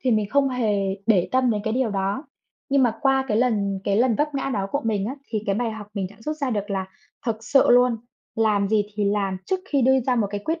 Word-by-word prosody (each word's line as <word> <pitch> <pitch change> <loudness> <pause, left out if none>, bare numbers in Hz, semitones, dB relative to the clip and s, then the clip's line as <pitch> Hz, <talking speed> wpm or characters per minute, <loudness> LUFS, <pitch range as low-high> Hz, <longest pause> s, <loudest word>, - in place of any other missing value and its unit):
thì 255 - 0
mình 215 -2 +1
không 280 -1 +3
hề 225 -6 0 0.3
để 195 -6 +3
tâm 255 -1 +3
đến 210 -2 0
cái 220 - -1
điều 255 -2 0
đó. 200 +7 -2 0.4
Nhưng 275 -1 +3
mà 225 -2 +1
qua 270 -1 +2
cái 210 - +1
lần 205 -5 +1
cái 200 0 +1
lần 245 0 +3
vấp 295 +3 -1
ngã 275 0 -2
đó 200 -6 -1
của 285 - 0
mình 210 -3 0
á, 260 - -3
thì 215 -3 -2
cái 195 - +1
bài 230 +2 -1
học 215 -2 -8
mình 195 -2 -2
đã 205 - -16
rút 305 +6 -4
ra 280 -4 -2
được 205 -2 -2
là, 190 -1 -2 0.4
thực 225 -1 -2
sự 270 +1 +4
luôn, 245 -1 +5 0.4
làm 210 -3 +2
gì 210 -1 +2
thì 210 - -1
làm, 200 -2 0
trước 375 -1 -1
khi 280 -4 +2
đưa 265 +1 +4
ra 255 +1 0
một 220 -3 +2
cái 205 0 -3
quyết 325 +1 -1
225 Hz, 265 wpm, -23 LUFS, 205-260 Hz, 0.4 s, luôn